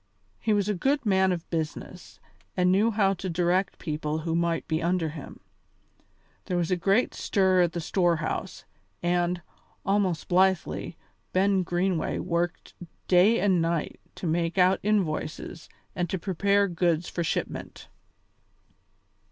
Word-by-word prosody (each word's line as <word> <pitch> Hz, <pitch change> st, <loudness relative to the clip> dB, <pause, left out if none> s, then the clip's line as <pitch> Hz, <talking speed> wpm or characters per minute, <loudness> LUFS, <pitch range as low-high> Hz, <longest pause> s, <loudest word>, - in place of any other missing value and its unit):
He 220 Hz, -, 0 dB
was 205 Hz, -1 st, +2 dB
a 210 Hz, -, +1 dB
good 270 Hz, +8 st, 0 dB
man 190 Hz, -2 st, +3 dB
of 175 Hz, -2 st, -3 dB
business, 165 Hz, +2 st, -5 dB, 0.4 s
and 180 Hz, 0 st, +3 dB
knew 205 Hz, +5 st, +4 dB
how 200 Hz, -3 st, +2 dB
to 190 Hz, 0 st, -5 dB
direct 180 Hz, +2 st, +1 dB
people 150 Hz, -1 st, -3 dB
who 165 Hz, -, -1 dB
might 170 Hz, -1 st, 0 dB
be 160 Hz, 0 st, -1 dB
under 170 Hz, -1 st, 0 dB
him. 150 Hz, -2 st, -9 dB, 1.1 s
There 180 Hz, -, -1 dB
was 175 Hz, 0 st, -1 dB
a -, -, +4 dB
great 195 Hz, +7 st, +2 dB
stir 190 Hz, -3 st, +2 dB
at 170 Hz, -2 st, +1 dB
the 170 Hz, -, -3 dB
storehouse, 170 Hz, -1 st, -1 dB, 0.4 s
and, 175 Hz, 0 st, 0 dB, 0.4 s
almost 195 Hz, -4 st, +1 dB
blithely, 190 Hz, -1 st, +1 dB, 0.4 s
Ben 195 Hz, +1 st, +3 dB
Greenway 175 Hz, 0 st, -1 dB
worked 170 Hz, -1 st, -2 dB, 0.3 s
day 190 Hz, +6 st, +5 dB
and 190 Hz, -4 st, +3 dB
night 165 Hz, -1 st, -1 dB, 0.2 s
to -, -, -7 dB
make 170 Hz, +2 st, 0 dB
out 185 Hz, +1 st, +4 dB
invoices 175 Hz, -4 st, -2 dB, 0.3 s
and 175 Hz, -2 st, -1 dB
to 190 Hz, -, -1 dB
prepare 200 Hz, +2 st, +1 dB
goods 170 Hz, -2 st, 0 dB
for 170 Hz, -, -3 dB
shipment. -, -, -4 dB
180 Hz, 140 wpm, -27 LUFS, 170-195 Hz, 1.1 s, day